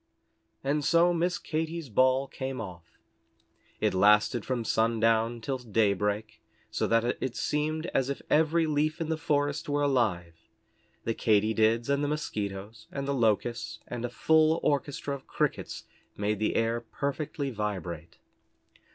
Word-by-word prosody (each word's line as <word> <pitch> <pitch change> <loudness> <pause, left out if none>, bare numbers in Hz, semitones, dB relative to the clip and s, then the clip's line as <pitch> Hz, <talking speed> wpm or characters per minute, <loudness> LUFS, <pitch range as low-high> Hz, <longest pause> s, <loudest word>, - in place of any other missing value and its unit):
And 145 +2 0
so 170 +4 +4
Miss 175 +1 0
Katy's 160 -1 -3
ball 130 +4 +3
came 130 -1 -5
off. 90 -6 -9 0.8
It - - +1
lasted 105 +4 +4
from 125 -3 -2
sundown 115 +1 +2
till 130 +2 -2
daybreak, 105 -2 0 0.3
so - - 0
that 115 0 +3 0.2
it 130 -3 -2
seemed 155 +2 -1
as 135 0 +1
if 140 - -2
every 160 +2 +3
leaf 155 +1 0
in 165 -1 -3
the 160 - +1
forest 145 -1 0
were 145 0 +1
alive. 110 - +1 0.7
The 115 - 0
Katy 110 -1 +2
Dids, 110 +2 +2
and 140 +1 +1
the - - +1
Mosquitoes, 105 -8 -4
and 140 -1 -4
the 140 - +1
Locusts, 115 -2 0
and 120 -1 -5
a 120 - -1
full 160 +5 +3
orchestra 145 0 -1
of 135 -1 -8
Crickets - - -2 0.3
made 105 0 -1
the 110 - 0
air 115 +1 +1
perfectly 140 +3 -3
vibrate. 90 -7 -4
125 Hz, 145 wpm, -29 LUFS, 110-145 Hz, 0.8 s, so